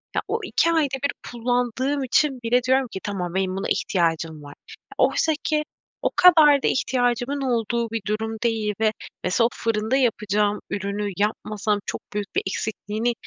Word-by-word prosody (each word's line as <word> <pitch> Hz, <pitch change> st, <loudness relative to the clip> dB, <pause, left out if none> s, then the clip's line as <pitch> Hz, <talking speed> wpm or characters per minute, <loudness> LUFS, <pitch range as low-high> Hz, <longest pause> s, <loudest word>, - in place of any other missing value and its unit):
ya, -, -, +2 dB
o, -, -, -1 dB
2 335 Hz, -, +2 dB
ayda 300 Hz, -5 st, +1 dB
1 285 Hz, -, +2 dB, 0.2 s
kullandığım 245 Hz, +3 st, 0 dB
için 265 Hz, +1 st, +2 dB
bile 245 Hz, +2 st, +2 dB
diyorum 260 Hz, +1 st, +2 dB
ki 190 Hz, -, -7 dB
"Tamam, 180 Hz, -4 st, -3 dB
benim 190 Hz, -1 st, 0 dB
buna 195 Hz, -, -2 dB
ihtiyacım 165 Hz, -4 st, 0 dB
var." 145 Hz, -, -10 dB, 0.4 s
Oysa 320 Hz, -, +3 dB
ki 305 Hz, -1 st, +1 dB, 0.4 s
o -, -, +1 dB
kadar 310 Hz, -6 st, +7 dB
da -, -, +3 dB
ihtiyacımın 250 Hz, +2 st, 0 dB
olduğu 235 Hz, -2 st, 0 dB
bir 225 Hz, -1 st, -2 dB
durum 220 Hz, +1 st, -2 dB
değil 220 Hz, -3 st, 0 dB
ve 220 Hz, -1 st, +3 dB, 0.3 s
mesela 180 Hz, +6 st, +2 dB
"O, 235 Hz, -, +3 dB
fırında 220 Hz, +2 st, 0 dB
yapacağım 210 Hz, -4 st, +1 dB
ürünü 200 Hz, +1 st, -2 dB
yapmasam 210 Hz, 0 st, -1 dB
çok -, -, -4 dB
büyük 205 Hz, -1 st, -4 dB
bir -, -, +3 dB
eksikliğini 215 Hz, +3 st, -2 dB
225 Hz, 165 wpm, -23 LUFS, 205-255 Hz, 0.4 s, kadar